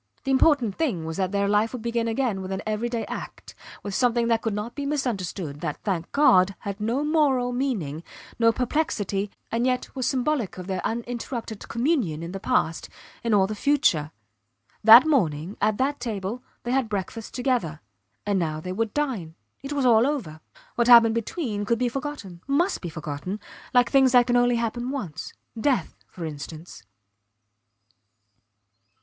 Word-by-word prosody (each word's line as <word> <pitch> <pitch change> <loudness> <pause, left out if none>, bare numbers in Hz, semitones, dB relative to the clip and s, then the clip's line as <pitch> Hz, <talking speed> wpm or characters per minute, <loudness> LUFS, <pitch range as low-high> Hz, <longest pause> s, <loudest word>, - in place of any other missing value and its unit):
The 270 - -1
important 265 -5 +3
thing 220 - -1
was 160 0 -5
that 190 -1 0
their 200 0 +1
life 210 +3 +2
would 245 -3 -6
begin 235 0 -1
again 225 -4 -1
with 190 0 -6
an 190 +1 -3
every 215 +2 -1
day 235 -1 -2
act - - -8 0.3
with 200 - -5
something 235 0 +2
that 225 -1 +2
could 225 -3 -2
not 210 +3 -4
be 285 - -5
misunderstood, 195 - -3
that, 150 - -3
thank 175 -5 -2
God, 195 -10 +4
had 200 +1 -5
no 235 +7 0
moral 280 -5 +2
meaning, 210 - -2 0.4
no 230 0 +5
perplexity 215 -6 -1 0.2
and 230 +1 0
yet 250 +1 -2
was 260 -3 -1
symbolic 255 -6 -1
of 180 - -6
their 185 -1 -3
uninterrupted 235 -1 -4
communion 235 - 0
in 170 - -6
the 195 - -5
past 165 -3 0 0.3
in 235 - 0
all 200 -2 +5
the 210 - -4
future. 210 - +2 0.7
That 230 +6 +10
morning, 185 - +1
at 215 0 +2
that 280 +2 0
table, 220 -1 -4 0.2
they 240 - -3
had 260 -3 +1
breakfast 210 +2 -5
together; 245 - -1 0.5
and 200 -2 +1
now 155 -3 -2
they 180 +3 -6
would 220 +2 -2
dine. 230 - -2 0.3
It 275 +2 -7
was 285 -2 0
all 235 0 +5
over! 205 - -3 0.3
What 235 0 +1
had 245 - +9
happened 230 -1 +8
between 230 - -3
could 230 +3 +1
be 245 +1 0
forgotten 245 - -6
must 330 +7 +1
be 175 - -4
forgotten, 155 +5 -5 0.3
like 245 -1 +3
things 265 -2 +5
that 245 -1 +6
can 245 0 +1
only 245 0 +4
happen 235 +1 -2
once 190 - -5 0.3
death 250 - +1 0.2
for 170 - -7
instance. 155 - -8
230 Hz, 175 wpm, -25 LUFS, 190-255 Hz, 0.7 s, That